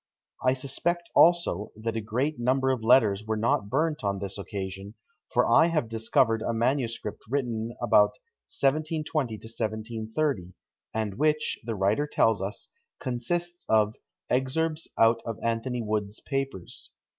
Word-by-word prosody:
I 130 Hz, -, +4 dB
suspect 170 Hz, +6 st, -2 dB
also, 170 Hz, -, +4 dB
that 110 Hz, +1 st, -3 dB
a 115 Hz, -, -1 dB
great 125 Hz, +7 st, -1 dB
number 130 Hz, +2 st, +2 dB
of 125 Hz, -4 st, -2 dB
letters 110 Hz, -4 st, +4 dB
were 110 Hz, 0 st, -2 dB
not 105 Hz, -2 st, +1 dB
burnt 155 Hz, +3 st, 0 dB
on 100 Hz, -1 st, 0 dB
this 100 Hz, 0 st, -5 dB
occasion; 100 Hz, 0 st, -6 dB, 0.4 s
for 125 Hz, -, +3 dB
I 140 Hz, +8 st, +6 dB
have 155 Hz, -8 st, 0 dB
discovered 115 Hz, 0 st, +2 dB
a 115 Hz, -, -1 dB
manuscript 115 Hz, -3 st, -1 dB
written 120 Hz, -4 st, -2 dB
about -, -, +4 dB, 0.4 s
1720 150 Hz, -3 st, 0 dB
to -, -, -13 dB
1730, 110 Hz, -, -2 dB, 0.4 s
and 110 Hz, -1 st, -3 dB
which, 155 Hz, 0 st, +1 dB
the 115 Hz, 0 st, -3 dB
writer 105 Hz, +9 st, +1 dB
tells 115 Hz, -6 st, +2 dB
us, 100 Hz, +3 st, -5 dB, 0.3 s
consists 175 Hz, +8 st, -2 dB
of 110 Hz, -1 st, +4 dB, 0.3 s
"Excerpts 155 Hz, +5 st, 0 dB
out 115 Hz, 0 st, +4 dB
of 115 Hz, -2 st, -4 dB
Anthony 115 Hz, +1 st, -1 dB
Wood's 105 Hz, -1 st, -2 dB
papers." 135 Hz, -10 st, -5 dB
115 Hz, 140 wpm, -27 LUFS, 110-140 Hz, 0.4 s, I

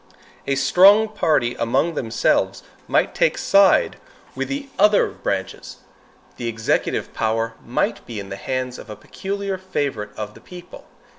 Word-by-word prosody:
A 135 Hz, -, +1 dB
strong 195 Hz, +10 st, +6 dB
party 155 Hz, -, +1 dB
among 120 Hz, +8 st, +1 dB
themselves 115 Hz, -6 st, 0 dB, 0.2 s
might -, -, +1 dB
take -, -, +1 dB
side 200 Hz, -, +4 dB, 0.4 s
with -, -, -3 dB
the 275 Hz, 0 st, -4 dB
other 210 Hz, -1 st, +5 dB
branches. -, -, -4 dB, 0.6 s
The 120 Hz, -, -4 dB
executive 115 Hz, -1 st, -1 dB
power 115 Hz, 0 st, -1 dB
might 120 Hz, -, -1 dB
be 115 Hz, -3 st, -6 dB
in 100 Hz, -1 st, -8 dB
the 95 Hz, -, -5 dB
hands 130 Hz, +4 st, -4 dB
of -, -, -12 dB
a 105 Hz, -, -7 dB
peculiar 195 Hz, -, -5 dB
favorite 140 Hz, -, -3 dB
of 105 Hz, -1 st, -5 dB
the -, -, -16 dB
people. 180 Hz, 0 st, -12 dB
135 Hz, 145 wpm, -21 LUFS, -, 0.6 s, strong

